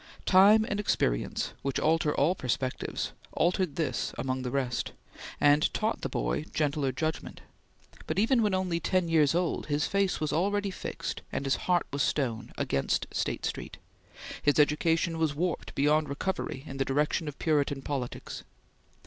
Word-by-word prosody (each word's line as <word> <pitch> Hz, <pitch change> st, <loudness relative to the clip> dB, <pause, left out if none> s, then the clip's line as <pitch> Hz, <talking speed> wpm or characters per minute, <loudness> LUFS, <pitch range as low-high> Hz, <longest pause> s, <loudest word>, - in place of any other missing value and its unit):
Time 205 Hz, +4 st, +6 dB
and 205 Hz, -, -2 dB
experience, -, -, 0 dB
which 135 Hz, 0 st, -1 dB
alter 155 Hz, -1 st, +2 dB
all 150 Hz, +6 st, +3 dB
perspectives, 130 Hz, -4 st, -2 dB, 0.2 s
altered 180 Hz, -3 st, +1 dB
this 160 Hz, -4 st, -2 dB
among 130 Hz, 0 st, -2 dB
the 125 Hz, -, -3 dB
rest, 125 Hz, -2 st, -2 dB, 0.5 s
and 145 Hz, +1 st, +4 dB
taught -, -, -1 dB
the -, -, -2 dB
boy -, -, -1 dB
gentler 145 Hz, -3 st, +1 dB
judgment, 155 Hz, +5 st, -4 dB, 0.7 s
but 155 Hz, -, -2 dB
even 230 Hz, +4 st, +3 dB
when 210 Hz, -3 st, +2 dB
only 180 Hz, -3 st, 0 dB
ten 185 Hz, 0 st, +1 dB
years 160 Hz, -2 st, +3 dB
old, 175 Hz, -1 st, 0 dB
his 145 Hz, 0 st, +1 dB
face 195 Hz, -1 st, +1 dB
was 155 Hz, -1 st, -1 dB
already 200 Hz, +4 st, +1 dB
fixed, -, -, -5 dB
and 140 Hz, -, -3 dB
his 135 Hz, -, +2 dB
heart 175 Hz, -1 st, +3 dB
was 140 Hz, -, 0 dB
stone, 120 Hz, -7 st, -1 dB
against 70 Hz, -, 0 dB
State -, -, -2 dB
Street; -, -, -4 dB, 0.6 s
his 145 Hz, -, +3 dB
education 165 Hz, +3 st, +2 dB
was 155 Hz, -2 st, +1 dB
warped 175 Hz, +2 st, -2 dB
beyond 150 Hz, +2 st, +2 dB
recovery 140 Hz, -2 st, -3 dB
in 135 Hz, -, -7 dB
the 135 Hz, -, +2 dB
direction 150 Hz, +3 st, 0 dB
of 145 Hz, -, -6 dB
Puritan 145 Hz, -3 st, 0 dB
politics. 135 Hz, -4 st, -4 dB
150 Hz, 155 wpm, -29 LUFS, 140-180 Hz, 0.7 s, Time